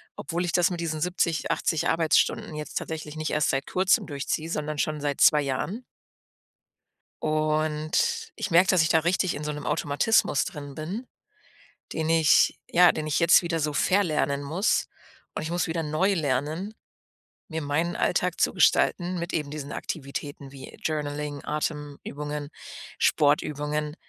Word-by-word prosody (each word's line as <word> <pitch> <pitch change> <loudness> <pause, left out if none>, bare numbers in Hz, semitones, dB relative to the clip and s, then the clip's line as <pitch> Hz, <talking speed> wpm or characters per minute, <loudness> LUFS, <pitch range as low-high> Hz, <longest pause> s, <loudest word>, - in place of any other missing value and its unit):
obwohl 175 0 -3
ich 175 - -1
das 175 -1 +3
mit 175 - -4
diesen 160 -2 -3
70, 170 -2 0
80 160 - 0
Arbeitsstunden 160 -1 +1
jetzt 150 0 -4
tatsächlich 155 -1 -6
nicht 155 0 -2
erst 150 -1 +1
seit 135 0 -2
Kurzem 185 +1 +2
durchziehe, 150 +2 -3
sondern 150 -2 -3
schon 155 +1 -1
seit 145 -1 -2
2 150 -1 +6
Jahren. 155 - -3 1.4
Und 155 0 0
ich 195 - -3
merke, 175 +2 +5
dass 185 -4 +4
ich 160 - +2
da 160 - +5
richtig 180 +2 +1
in 145 - -5
so 150 - -2
'nem 150 0 -7
Automatismus 145 0 +2
drin 145 -1 -8
bin, 185 - -5 0.9
den 160 -1 -2
ich 160 -2 +4
ja, 175 0 +6
den 155 - -4
ich 155 - 0
jetzt 170 +1 +6
wieder 170 -1 -1
so 150 0 -1
verlernen 155 -4 +1
muss 165 +9 0 0.5
und - - -3
ich 155 - -4
muss 175 0 0
wieder 165 0 -2
neu 155 +6 +1
lernen, 155 +6 -2 0.8
mir 160 -1 -3
meinen 160 +4 -1
Alltag - - 0
zu - - +3
gestalten 180 0 +2
mit 170 0 -4
eben 150 -3 -2
diesen 145 -2 -6
Aktivitäten 140 -1 -6
wie 135 -1 -11
Journaling, 150 -2 -3
Atemübungen, 150 -1 -4 0.5
Sportübungen 150 +1 +1
155 Hz, 155 wpm, -26 LUFS, 150-170 Hz, 1.4 s, 2